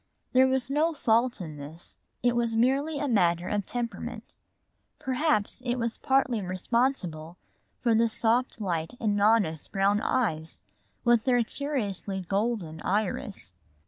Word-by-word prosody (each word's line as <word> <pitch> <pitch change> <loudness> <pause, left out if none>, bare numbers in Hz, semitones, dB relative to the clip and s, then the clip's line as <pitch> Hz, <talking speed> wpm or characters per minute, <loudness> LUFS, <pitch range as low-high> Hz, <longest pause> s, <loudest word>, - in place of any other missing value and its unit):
There 260 +1 +6
was 260 0 0
no 315 +3 +2
fault 235 -3 +2
in 155 -4 -7
this, 150 +4 -10 0.2
it 245 -1 +3
was 235 -1 +1
merely 275 +6 +2
a 290 - -1
matter 175 -7 +2
of 205 -2 -1
temperament. 240 -1 -5 0.6
Perhaps 260 -4 0
it 245 0 0
was 230 -2 -2
partly 265 -4 +2
responsible 185 - -1 0.4
for 235 -2 +3
the 230 +1 +3
soft 230 +3 +1
light 170 -1 -2
in 210 -3 +1
Nona's 205 -7 +2
brown 200 +2 +2
eyes 165 -13 -1 0.4
with 240 -2 +3
their 245 -2 +4
curiously 210 -8 -3
golden 195 -6 -1
iris. 200 - -2
225 Hz, 135 wpm, -28 LUFS, 190-250 Hz, 0.6 s, There